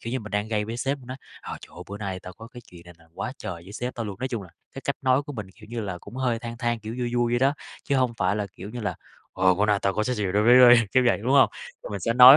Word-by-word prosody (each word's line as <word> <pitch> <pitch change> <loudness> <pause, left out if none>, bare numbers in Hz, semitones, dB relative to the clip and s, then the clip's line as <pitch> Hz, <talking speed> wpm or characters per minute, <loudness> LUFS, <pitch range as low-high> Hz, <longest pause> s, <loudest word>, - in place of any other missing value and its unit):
kiểu 115 - -5
như 130 - -1
mình 110 -1 -9
đang 105 +1 -1
gây 105 -2 0
với 115 +2 -5
sếp 135 +4 -1
mình 125 - -15
nói: 130 - -6 0.2
"Ờ, - - -6
trời - - -13
ơi - - -6
bữa 100 - -5
nay 95 -3 -4
tao 90 - -9
có 115 +3 -11
cái 120 0 -11
chuyện 85 -1 -13
này 85 - -13
là 85 - -21
quá 100 +7 -4
trời - - -5
với 95 - -11
sếp 125 +4 -4
tao 115 - -3
luôn", 100 -2 -6
nói 130 +1 -2
chung 115 -5 -3
là, 95 - -12 0.2
cái - - -7
cách - - -1
nói 130 +2 +3
của 145 0 -8
mình, 105 -7 -5
kiểu 105 0 -15
như 120 -1 -3
là, 95 -4 -4
cũng 120 - -11
hơi 125 -3 0
than 115 0 -6
than, 120 -2 0
kiểu 110 +1 -6
vui 120 -1 -1
vui 120 -1 +2
vậy 120 - +3
đó, 135 +3 +3 0.3
chứ 140 - +1
hông 125 -2 +2
phải 95 +1 +2
là 105 -1 -1
kiểu 100 - -9
như 120 +2 -6
là 105 - -2 0.4
"Ờ, 95 0 +4
bữa 105 +3 +2
này 105 -1 +3
tao 100 - +2
có 105 - +1
cái 125 - 0
ch - - -3
đối 105 - +4
với 120 +3 +7
ấy" 120 -1 +9
kiểu 130 - +5
vậy, 120 - +4
đúng 125 +4 +1
hông? 140 - +6 0.3
Thì - - -7
mình - - -4
sẽ 115 - +1
nói, 125 +3 +11
115 Hz, 345 wpm, -26 LUFS, 105-125 Hz, 0.4 s, nói